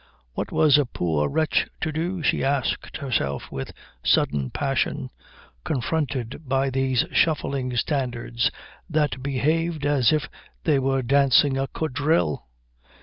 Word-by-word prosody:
What - - -4
was 150 -2 +5
a 145 - +1
poor 80 -9 0
wretch 155 +2 +1
to 155 - -1
do, 170 +3 -2
she - - +1
asked 135 -1 -1
herself 105 - -2
with 65 - -5 0.3
sudden 70 -3 +2
passion, - - -1 0.5
confronted 135 -3 -2
by 135 0 +1
these 130 -1 +1
shuffling 135 -5 +1
standards 120 -3 0 0.4
that 150 -4 0
behaved 155 +3 0
as 145 -5 +3
if 155 -1 0 0.4
they 150 -4 +3
were 135 0 0
dancing 140 +1 +4
a 135 0 -1
quadrille? 135 - 0
135 Hz, 125 wpm, -24 LUFS, 125-150 Hz, 0.5 s, was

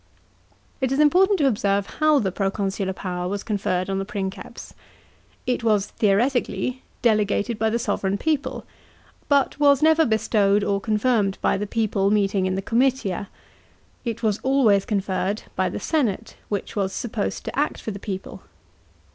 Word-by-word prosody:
It 260 -1 0
is 270 - 0
important 370 +7 +5
to 295 - +2
observe 200 -4 +1
how 310 -1 +5
the 195 -8 0
proconsular 195 0 -1
power 180 -1 -4
was 200 +1 -3
conferred 190 -4 -1
on 195 0 -1
the - - -1
Princeps. 195 -2 -6 0.7
It 250 -1 -1
was, 210 -3 +2
theoretically, 245 +5 0 0.2
delegated 215 0 +1
by 220 0 +2
th« 235 +1 -1
sovran 200 -1 -1
people, 310 -3 -1 0.6
but 280 0 +2
was 285 -1 +4
never 320 +1 +5
bestowed 215 -4 +2
or 200 0 0
confirmed 215 -2 +1
by - - +1
the 205 +1 -3
people 205 -3 0
meeting 195 -2 +1
in 185 - -1
the 195 - -3
comitia. 230 -5 0 0.7
It 235 -2 -4
was 215 -2 +1
always 245 -8 +3
conferred 200 0 -1
by 185 0 +1
the - - -5
senate, 230 - -1
which 205 -2 -3
was 195 -2 -1
supposed 225 -3 -3
to - - -5
act 295 - 0
for 220 - -5
the 200 - -7
people. 190 -1 -6
210 Hz, 155 wpm, -23 LUFS, 195-250 Hz, 0.7 s, important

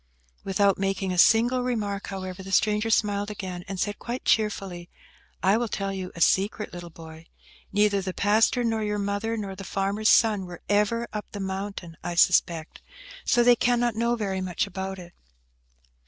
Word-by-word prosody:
Without 195 0 +2
making 195 -1 -1
a 180 - -2
single 240 +6 +5
remark, 210 -5 -2
however, 185 -1 -6
the 190 0 -8
stranger 210 +2 +2
smiled 205 -1 +1
again, 185 -4 -6
and 195 -1 -5
said, 205 +3 -2
quite 245 +2 -5
cheerfully, 195 -5 0 0.5
"I 195 +3 +4
will 240 0 -1
tell 195 -2 -3
you 185 -1 -5
a 170 - -7
secret, 200 +5 +2
little 175 -1 -8
boy. 160 0 -12 0.4
Neither 205 -1 +2
the 190 0 -3
pastor, 215 +5 +2
nor 225 -1 0
your 210 0 -1
mother, 205 +3 -2
nor 200 -3 -5
the 195 - -8
farmer's 200 +3 0
son 210 -5 +4
were 175 -1 -10
ever 210 +3 +1
up 210 -1 -5
the 205 - -5
mountain, 190 -3 -5
I 175 - -3
suspect, 170 -2 +2 0.4
so 240 - +4
they 245 0 +6
cannot 240 0 +1
know 235 +2 +1
very 195 -4 -2
much 185 +3 -1
about 190 -1 -5
it." 175 -1 -11
200 Hz, 175 wpm, -26 LUFS, 190-215 Hz, 0.5 s, they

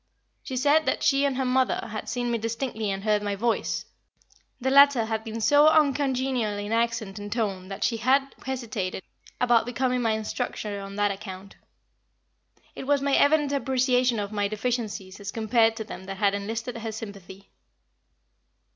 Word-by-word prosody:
She 260 -3 -5
said 295 +4 +3
that - - 0
she 275 0 +3
and 275 -2 0
her 265 - 0
mother 255 -2 +1
had 215 - -5
seen 245 0 -2
me 235 - 0
distinctly 230 -1 -3
and 195 0 -3
heard 210 -1 +2
my 205 -1 -2
voice. 230 +3 -1 0.7
The 265 +1 0
latter 280 -4 +6
had 220 0 -2
been 225 0 -5
so 290 +7 +5
uncongenial 265 -7 +2
in 205 +1 -5
accent 230 -3 -1
and 205 0 -7
tone 200 -5 -2
that 195 0 -5
she 230 - +1
had 270 +4 +2
hesitated 225 -8 -4 0.4
about 240 -2 +3
becoming 250 0 0
my 225 -2 +1
instructor 215 -1 -3
on 195 0 -8
that 205 0 +1
account. 195 -1 -8 1.2
It 265 - -8
was 285 -1 +2
my 280 0 +1
evident 295 0 +4
appreciation 255 -3 +2
of 205 -1 -3
my 205 -1 0
deficiencies 215 -3 -3
as 200 0 -5
compared 225 +1 +2
to 225 - -4
them 190 - -9
that 195 0 -6
had 200 0 +2
enlisted 225 +4 -4
her 225 0 -4
sympathy. 200 -3 -10
230 Hz, 170 wpm, -26 LUFS, 205-260 Hz, 1.2 s, latter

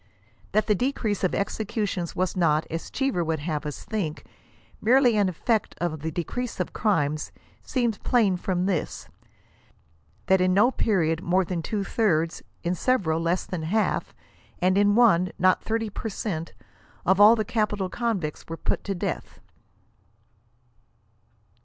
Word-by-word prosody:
That 215 +1 +3
the 210 - +3
decrease 220 -3 -1
of 185 - +1
executions 200 -4 -2
was 185 0 -1
not, 160 -4 +2
as 165 +1 -4
Cheever 270 -10 0
would 160 -1 -1
have 150 -1 -3
us 150 - -6
think 175 -8 -3
it, - - -26 0.5
merely 245 +1 +4
an 205 -3 +3
effect 215 +5 -1
of 170 -3 -2
the 160 +3 -3
decrease 225 +10 -4
of - - -2
crimes, 155 -8 0 0.3
seems 235 -6 -1
plain 220 -7 +2
from 180 0 -1
this; 185 -6 -2 1.2
that 190 0 +4
in 185 0 +3
no 210 +6 +5
period 165 -10 +1
more 185 +1 +2
than 170 -1 -3
two 205 +4 -2
thirds, 170 -7 0 0.2
in 175 +1 0
several 180 -6 +1
less 170 +2 0
than 180 -3 -4
half, 200 +8 -1 0.4
and 185 +1 +2
in 205 +1 +4
one, 185 -7 +4
not 185 +1 +3
30 225 -1 -2
per 220 +3 -4
cent, 170 -5 -4 0.5
of 190 +2 +4
all 215 +3 +9
the 215 -2 -1
capital 210 -3 0
convicts 195 -8 -3
were 165 - -5
put - - -2
to 195 - -2
death. 175 - -4
190 Hz, 150 wpm, -25 LUFS, 170-220 Hz, 1.2 s, all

